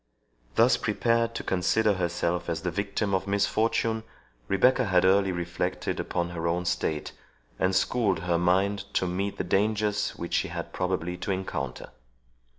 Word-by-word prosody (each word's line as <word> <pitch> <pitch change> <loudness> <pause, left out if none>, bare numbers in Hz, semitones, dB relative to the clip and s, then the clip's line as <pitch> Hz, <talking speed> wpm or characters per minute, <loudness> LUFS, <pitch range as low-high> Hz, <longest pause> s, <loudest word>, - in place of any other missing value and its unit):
Thus - - +5
prepared 115 0 +1
to - - -3
consider 105 +4 +2
herself 85 -1 -1
as 80 -1 -2
the 90 - -1
victim 100 +2 -2
of 95 +1 0
misfortune, 110 +2 +1 0.5
Rebecca 125 +6 +3
had 95 -2 +3
early 95 0 +4
reflected 85 -1 -2
upon 85 -1 -2
her 85 -1 -3
own 90 +2 0
state, 80 -3 -1 0.5
and 95 0 +2
schooled 100 -3 +1
her 85 -1 +1
mind 95 +3 +2
to - - +2
meet 95 +3 -2
the - - -1
dangers 105 +1 +1
which 85 - -6
she - - +2
had - - -6
probably 90 -1 -2
to - - -6
encounter. 95 0 -3
95 Hz, 155 wpm, -27 LUFS, 90-105 Hz, 0.5 s, Thus